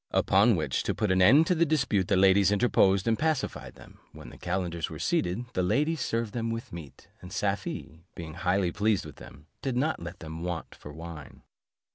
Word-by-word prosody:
Upon 105 +4 +3
which, 75 -6 -1
to - - -1
put 105 -3 0
an 95 0 +3
end 135 - +7
to 180 - +2
the 170 -1 +2
dispute, 130 - +1
the 100 - +2
ladies 95 +1 +5
interposed, 100 -3 +3
and 115 -1 +1
pacified 155 -2 -2
them. - - -16
When - - -11
the - - -13
calenders 85 -2 -3
were - - -8
seated, 90 +8 -1
the 90 - 0
ladies 145 - +1
served 115 -3 -2
them 115 -1 -2
with 115 -4 -5
meat; 80 -5 -10
and - - -11
Safie, 80 +2 -3
being 80 -2 -7
highly 90 +1 0
pleased 105 0 0
with - - -11
them, 70 +3 -13 0.2
did 130 -3 -2
not 150 - 0
let 85 +2 -7
them 80 0 -8
want 85 -2 -4
for 75 - -11
wine. 80 -1 -10
95 Hz, 200 wpm, -28 LUFS, 85-115 Hz, 0.2 s, end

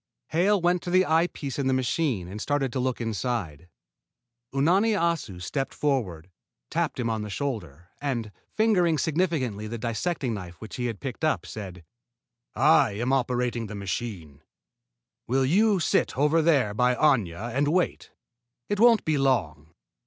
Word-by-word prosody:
Hale 195 +5 +3
went 175 0 +2
to - - -6
the 185 +1 +4
eye 165 +2 +3
piece 140 -5 -6
in 135 - 0
the 130 - +2
machine 130 - 0
and 100 +4 -7
started 140 -2 -1
to 130 - -1
look 130 0 -1
inside. 105 - -3 0.8
Unani 180 +11 +3
Assu 165 - -1
stepped 135 +9 -3
forward, 95 - -2 0.4
tapped - - -1
him 120 - 0
on 110 -1 -1
the 105 - -5
shoulder, 90 - -5
and, 120 -7 -2 0.2
fingering 185 -7 +2
significantly 145 - -1
the 115 +2 -5
dissecting 120 +4 -2
knife 90 -4 -8
which 110 - -8
he 125 -1 -1
had 115 -4 -5
picked 135 +2 -6
up, 155 - +1
said: 95 -5 -8 0.7
"I 140 -5 +4
am 120 +6 -1
operating 125 -3 0
the 105 - -7
machine. 95 -7 -5 0.9
Will 130 +2 +2
you 200 +7 +3
sit 160 - +1
over 150 +4 +3
there 140 -10 +2
by 125 +3 +2
Aña 115 - +1
and 145 +2 +1
wait? 175 +4 0 0.6
It 205 - -1
won't 230 -1 +5
be 155 -2 +1
long. 85 - 0
130 Hz, 160 wpm, -26 LUFS, 105-155 Hz, 0.9 s, won't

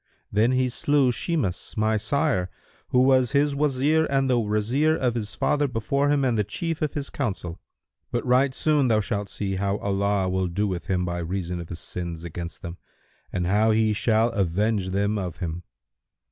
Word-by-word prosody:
Thus 110 +5 +3
he 130 0 +2
slew 135 +1 +2
Shimas 125 - -2
my 110 +1 +2
sire, 110 - 0 0.4
who 125 0 +3
was 130 -1 +3
his 145 0 +2
Wazir 150 +2 +2
and 135 -1 +2
the 125 -2 +3
Wazir 115 +9 +1
of 125 -6 0
his 110 -3 -4
father 145 0 +1
before 140 +4 0
him 145 -2 +2
and 125 -3 +2
the - - +3
chief 165 - -3
of 155 -2 -1
his 140 -2 -3
council; 95 - -4 0.5
but 120 - -2
right 130 +2 +3
soon 150 -4 +2
thou 110 -2 +3
shalt 100 -2 -2
see 95 -1 -3
how 100 +1 0
Allah 100 -1 0
will 95 0 0
do 100 +5 -1
with 90 -3 -4
him 90 -1 0
by 85 0 -3
reason 90 +1 -3
of 85 - -8
his 85 - -6
sins 85 -2 -5
against 85 +3 -7
them 85 -1 -7 0.5
and 90 - -1
how 105 +4 +3
He 110 0 +3
shall 110 +2 +2
avenge 100 +1 0
them 100 +2 0
of 90 -3 -5
him." 85 -1 -4
110 Hz, 190 wpm, -25 LUFS, 95-135 Hz, 0.5 s, Thus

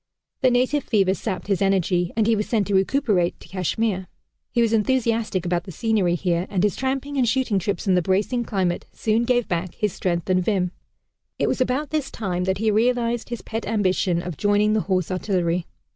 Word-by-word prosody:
The 260 - +5
native 255 +3 +1
fever 195 -4 +2
sapped 190 -3 -4
his 200 -1 0
energy, 180 -2 +1
and 220 - +3
he 230 +1 +3
was 210 0 -2
sent 215 -4 +1
to 205 - -2
recuperate, 195 -3 +1
to - - -14
Kashmir. 190 +1 -1 0.4
He - - 0
was 230 -1 +3
enthusiastic 225 -4 +1
about 175 0 -1
the 190 - -7
scenery 195 -1 +1
here, 175 0 -1
and 190 -2 0
his 210 - +2
tramping 270 +2 -2
and 245 -3 +3
shooting 250 -5 +1
trips 200 +4 -2
in 190 - +3
the 180 - +3
bracing 200 +7 0
climate 190 -6 -1
soon 225 +2 +1
gave 245 -1 +1
back 175 0 -3
his 210 -4 -1
strength 170 -2 -2
and 185 -1 +2
vim. 185 -3 0 0.7
It - - +1
was - - 0
about 260 +3 0
this 305 -3 -1
time 180 -4 -3
that 190 0 0
he 220 +1 +1
realized 235 +1 +1
his 240 -2 -5
pet 225 +1 -4
ambition 185 -4 +1
of 175 -5 -6
joining 205 +1 +2
the 215 - +2
Horse 185 -2 +1
Artillery. 180 -2 -1
205 Hz, 205 wpm, -23 LUFS, 185-230 Hz, 0.7 s, The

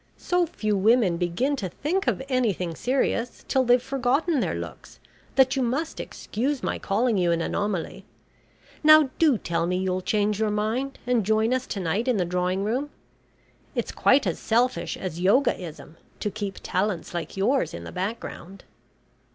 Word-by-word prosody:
So 355 -1 +1
few 215 -9 -1
women 200 -3 +3
begin 180 +12 0
to 190 -7 -3
think 350 - -2
of - - 0
anything 215 - 0
serious 245 0 -1
till 265 - +2
they've 245 0 +5
forgotten 270 +5 0
their 190 - -1
looks, 85 -4 -8 0.4
that 265 0 +4
you 270 - 0
must 270 +7 -1
excuse 265 +5 -3
my - - -2
calling 220 +1 +1
you 175 -1 +2
an 170 - +1
anomaly. 195 +1 -2 0.8
Now 310 -3 +7
do 300 -7 +4
tell 170 -3 -1
me 180 +1 0
you'll 185 0 -1
change 210 +1 0
your 220 -1 +1
mind 220 +6 -1
and 245 -3 +2
join 220 +4 +2
us 255 0 -1
to 200 - -4
night 190 +7 -1
in 250 -4 +2
the 180 - +1
drawing 180 +2 -1
room. 255 +8 -1 0.9
It's - - -2
quite 270 -2 +3
as 175 - -1
selfish 240 +3 0
as 175 -2 -5
Yogaism 180 - 0 0.2
to 210 - -2
keep 200 -1 -5
talents 185 -2 -1
like 175 +2 -5
yours 245 +8 +1
in 85 - -7
the - - -8
background." 190 -1 -5
215 Hz, 170 wpm, -25 LUFS, 185-255 Hz, 0.9 s, Now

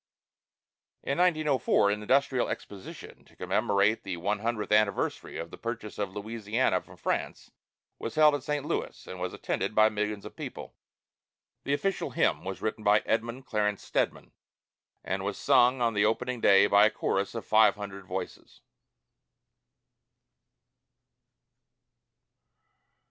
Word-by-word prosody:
In 140 - -2
1904 150 - +3
an 105 +1 -2
industrial 130 +2 +2
exposition 100 -2 -8
to - - -23
commemorate 100 +2 +1
the 90 -2 -5
one 100 +4 -1
hundredth 110 -1 -3
anniversary 105 -1 +1
of 85 0 -6
the - - -11
purchase 115 -3 -6
of 100 -1 -3
Louisiana 110 +3 -1
from - - -17
France - - -3 0.5
was 115 - -5
held 155 -1 +6
at 145 - -1
St. 145 +1 -3
Louis, - - -4
and 95 - -8
was 90 0 -3
attended - - -3
by 110 0 +6
millions 105 -1 -3
of - - -10
people. - - -8 0.9
The 140 - +1
official 195 +6 -2
hymn - - +1
was 95 0 -6
written 110 0 -3
by 105 +1 +4
Edmund 115 +3 -2
Clarence 105 -3 -1
Stedman, - - -2 0.7
and 95 0 -3
was 100 0 -3
sung 130 -2 +4
on 115 -1 +2
the 105 0 +2
opening 125 +2 -1
day 100 0 +6
by 100 +1 +6
a - - +1
chorus 100 -1 -2
of 115 - -5
five 110 0 +5
hundred 100 -2 -8
voices. - - -7
110 Hz, 140 wpm, -28 LUFS, 100-125 Hz, 0.9 s, held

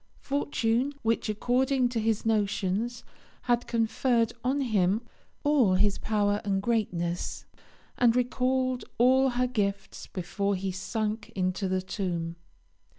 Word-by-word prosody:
Fortune, 270 -2 0
which, 225 -1 0
according 250 +4 +2
to 240 -2 -2
his 220 -1 0
notions, 210 +1 0 0.4
had 240 -1 +1
conferred 230 0 +1
on 270 +3 +1
him 210 -3 +1 0.4
all 275 -11 +4
his 200 +1 +2
power 205 -1 +1
and 195 -1 0
greatness, 180 -6 -1 0.5
had 240 -1 +5
recalled 255 +1 +1
all 260 +2 +5
her 250 0 +1
gifts 200 -5 -2
before 200 +2 -2
he 190 +1 -2
sank 215 +3 -3
into 185 +1 0
the 185 0 0
tomb. 170 -4 -3
225 Hz, 120 wpm, -28 LUFS, 195-245 Hz, 0.5 s, had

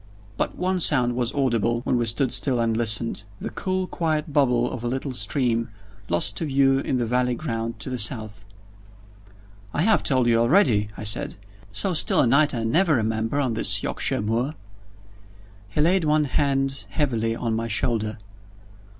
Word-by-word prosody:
But - - -2
one 185 0 -1
sound 125 -7 +3
was 120 -1 -1
audible, 120 -4 0
when 125 - -1
we 120 -1 0
stood 120 +3 0
still 130 -4 +1
and 115 -1 0
listened 115 -1 +2 0.2
the - - -5
cool 185 -1 -2
quiet 155 -4 -2
bubble 125 -4 +2
of 125 -2 -6
a - - -2
little 130 +2 -3
stream, 115 0 0 0.4
lost 85 +4 +1
to - - -1
view 135 -1 +2
in 135 - -1
the 120 - 0
valley 125 +1 0
ground 115 -5 -4
to - - -5
the 125 - -3
south. 110 -2 -2 1.3
"I 150 - +1
have 220 +1 +3
told 130 -3 +2
you 115 -1 +3
already," 115 - +3
I - - -6
said. 105 0 -1 0.4
"So 110 - -1
still 160 - +1
a - - +3
night 140 +3 +3
I 115 - -2
never 160 +8 +2
remember 110 +3 -1
on 130 -5 0
this 110 - +2
Yorkshire - - -1
moor." 120 +8 -1 1.1
He 125 - -1
laid 175 +3 +3
one 155 0 +2
hand 135 0 -1
heavily 115 -7 -1
on 115 -1 -2
my 115 +1 -2
shoulder. 110 -1 -1
125 Hz, 175 wpm, -23 LUFS, 115-145 Hz, 1.3 s, sound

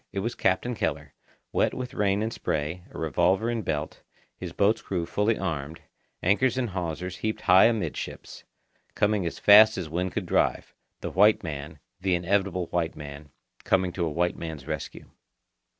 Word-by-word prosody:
It 100 - -3
was 115 +4 -2
Captain 95 +6 0
Keller, 75 -8 -3 0.4
wet - - +1
with 125 0 -5
rain 100 -3 +1
and 110 +1 -2
spray, 80 +4 -3
a - - -11
revolver 90 +8 +1
in 115 -1 -2
belt, 75 -5 -3 0.3
his - - -7
boat's 100 +2 +2
crew 90 -3 -3
fully 105 +5 0
armed, 80 -4 -4 0.4
anchors 115 +7 +2
and 120 -5 -1
hawsers 90 0 -4
heaped 110 0 -3
high 95 0 +6
amidships, 115 -2 -3 0.5
coming 105 -3 +1
as - - -5
fast 110 +1 +7
as 90 -4 -4
wind 90 +3 -2
could - - -2
drive—the - - -2
white 105 +4 +4
man, 75 -1 -6 0.2
the 95 -1 +1
inevitable 95 0 0
white 85 -2 -1
man, 75 0 -9 0.3
coming 95 -1 +2
to 85 0 -3
a - - -1
white 85 +3 0
man's 80 -5 -6
rescue. 75 -2 -6
90 Hz, 165 wpm, -26 LUFS, 80-105 Hz, 0.5 s, fast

